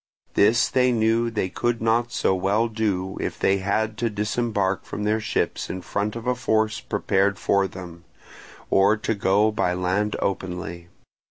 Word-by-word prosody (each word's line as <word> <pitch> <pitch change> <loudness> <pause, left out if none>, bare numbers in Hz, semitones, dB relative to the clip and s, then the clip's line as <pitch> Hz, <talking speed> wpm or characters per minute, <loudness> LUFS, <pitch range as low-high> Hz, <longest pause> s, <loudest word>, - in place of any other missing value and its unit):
This 110 +4 +4
they 125 -1 +2
knew 115 0 +2
they 110 -4 -1
could 120 +5 -1
not 115 +2 +1
so - - +1
well 100 +5 +1
do, 100 -4 -2
if - - -3
they 95 0 +2
had 105 +3 -1
to 120 - +1
disembark 105 -2 -1
from 105 - -6
their 105 +1 +1
ships 110 - -2
in 95 0 -5
front 100 +5 -2
of 115 0 -6
a 125 - +2
force 110 -3 0
prepared 100 +1 0
for 100 -1 +2
them, 85 -3 -10 0.7
or 100 +2 +4
to 110 +1 -1
go 100 +1 +2
by 90 -4 0
land 95 +4 0
openly. 90 -3 -4
105 Hz, 165 wpm, -24 LUFS, 95-110 Hz, 0.7 s, This